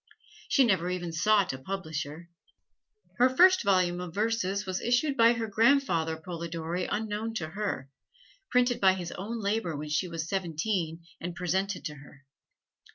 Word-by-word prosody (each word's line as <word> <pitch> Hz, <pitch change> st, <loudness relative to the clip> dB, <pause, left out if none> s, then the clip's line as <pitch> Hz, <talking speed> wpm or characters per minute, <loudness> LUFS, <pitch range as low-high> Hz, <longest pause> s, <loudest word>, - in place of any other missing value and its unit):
She 275 Hz, -, +5 dB
never 190 Hz, -7 st, +2 dB
even 175 Hz, -2 st, -3 dB
sought 200 Hz, +1 st, +3 dB
a 130 Hz, -, -7 dB
publisher. 160 Hz, -1 st, -5 dB, 0.9 s
Her 250 Hz, +1 st, +6 dB
first 370 Hz, +8 st, +6 dB
volume 185 Hz, -3 st, +2 dB
of 175 Hz, -2 st, -7 dB
verses 210 Hz, -2 st, 0 dB
was 185 Hz, -1 st, -3 dB
issued 250 Hz, +4 st, +1 dB
by 230 Hz, -1 st, +6 dB
her 230 Hz, -1 st, -2 dB
grandfather 210 Hz, -, +2 dB
Polidori 170 Hz, +1 st, -4 dB
unknown 220 Hz, +1 st, -3 dB
to 155 Hz, -7 st, -3 dB
her 195 Hz, -7 st, -3 dB, 0.6 s
printed 250 Hz, -1 st, +2 dB
by 190 Hz, -1 st, +6 dB
his 175 Hz, -2 st, -5 dB
own 225 Hz, +5 st, -5 dB
labor 200 Hz, -6 st, -1 dB
when 150 Hz, +1 st, -6 dB
she 150 Hz, +5 st, 0 dB
was 165 Hz, -2 st, -4 dB
seventeen 170 Hz, -2 st, -2 dB, 0.2 s
and 175 Hz, 0 st, -5 dB
presented 190 Hz, +2 st, -1 dB
to 150 Hz, -, -3 dB
her. 140 Hz, 0 st, -16 dB
185 Hz, 155 wpm, -29 LUFS, 165-220 Hz, 0.9 s, Her